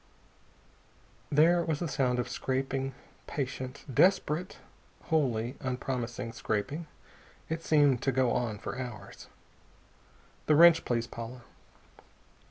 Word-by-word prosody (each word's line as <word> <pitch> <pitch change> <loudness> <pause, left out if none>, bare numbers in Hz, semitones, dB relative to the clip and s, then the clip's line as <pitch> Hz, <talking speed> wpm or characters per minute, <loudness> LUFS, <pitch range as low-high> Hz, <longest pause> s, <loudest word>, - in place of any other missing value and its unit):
There 165 +4 +5
was 160 -3 -1
the 175 - -2
sound 125 -4 0
of 125 0 -1
scraping, 135 0 -2 0.3
patient, 130 -1 -5
desperate, 180 +2 +2 0.5
wholly 130 -6 0
unpromising 125 -3 -3
scraping. 130 +8 -3 0.6
It 160 0 -2
seemed 145 -6 +3
to 135 - +1
go 130 -2 +2
on 120 -4 -1
for 120 - -6
hours. 120 -4 -8 1.2
"The 155 - +5
wrench, 165 +1 +7
please, 115 -1 0
Paula." 120 +1 -8
130 Hz, 105 wpm, -30 LUFS, 125-155 Hz, 1.2 s, wrench